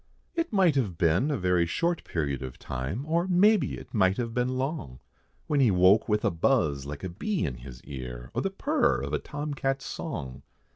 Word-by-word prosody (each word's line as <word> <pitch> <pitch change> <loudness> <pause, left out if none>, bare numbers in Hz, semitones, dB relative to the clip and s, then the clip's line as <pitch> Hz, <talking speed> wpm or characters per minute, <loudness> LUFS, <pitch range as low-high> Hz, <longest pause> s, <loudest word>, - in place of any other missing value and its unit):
It 335 -3 -1
might 190 -6 +4
have 100 -10 0
been 85 - +2
a 145 - 0
very 90 -3 +2
short 170 - 0
period 70 -5 -2
of 65 -1 -7
time, 65 - -4
Or 170 +3 +1
maybe 190 - +4
it - - -12
might 95 -4 +3
have 115 -2 -2
been 125 +1 0
long, 130 - -3 0.5
When 145 - +1
he 130 -4 +5
woke 95 +4 +4
with 105 0 +1
a - - +3
buzz 80 - +1
like 75 0 -7
a 95 - -3
bee 175 - -2
in 65 -5 -4
his 65 0 -11
ear, 60 -3 -7
Or - - 0
the - - 0
purr - - +1
of 70 +2 -4
a 75 - +1
tom 145 0 -5
cat's 135 0 -1
song. 70 - -5
100 Hz, 205 wpm, -28 LUFS, -, 0.5 s, he